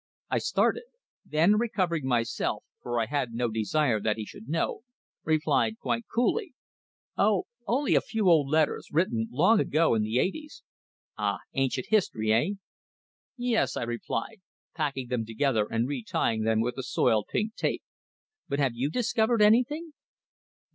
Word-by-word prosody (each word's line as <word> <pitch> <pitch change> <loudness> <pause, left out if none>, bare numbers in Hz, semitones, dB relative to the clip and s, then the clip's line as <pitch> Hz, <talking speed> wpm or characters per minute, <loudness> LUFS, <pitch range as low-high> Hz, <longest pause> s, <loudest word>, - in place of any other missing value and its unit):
I - - +2
started. 470 - +1 0.4
Then, 170 +8 +3
recovering 180 - -1
myself 120 -3 -1 0.2
for 120 -1 -2
I 115 - +1
had 125 -1 -2
no 120 +1 0
desire 115 +2 +1
that 105 +1 0
he 110 - -4
should 110 - -12
know 165 +7 -1 0.4
replied, 155 +5 +1
quite 230 0 -2
coolly: 325 - 0 0.6
"Oh, 205 -2 +3 0.2
only 270 +4 +1
a - - +4
few 220 -4 -1
old 155 -6 +5
letters 155 0 +1
written 120 -9 +1
long 185 - +4
ago, 160 - +2
in 110 - +2
the 110 +3 -1
eighties." 300 - -2 0.6
"Ah! - - 0 0.2
Ancient 135 -1 -1
history, 110 - +2
eh?" 120 +10 +2 0.9
"Yes," 240 - 0
I - - -2
replied, 120 - -4 0.3
packing 140 -5 -2
them 125 -3 -1
together 115 -1 0
and 115 +2 0
retying 115 -4 -1
them 110 0 +2
with 125 +3 -2
the - - -2
soiled, 110 -3 +1
pink 215 +2 -1
tape. - - -2 0.7
"But 140 - -1
have 135 -4 +1
you 125 +4 -1
discovered 225 +2 +2
anything?" 290 +9 +2
145 Hz, 150 wpm, -28 LUFS, -, 0.9 s, old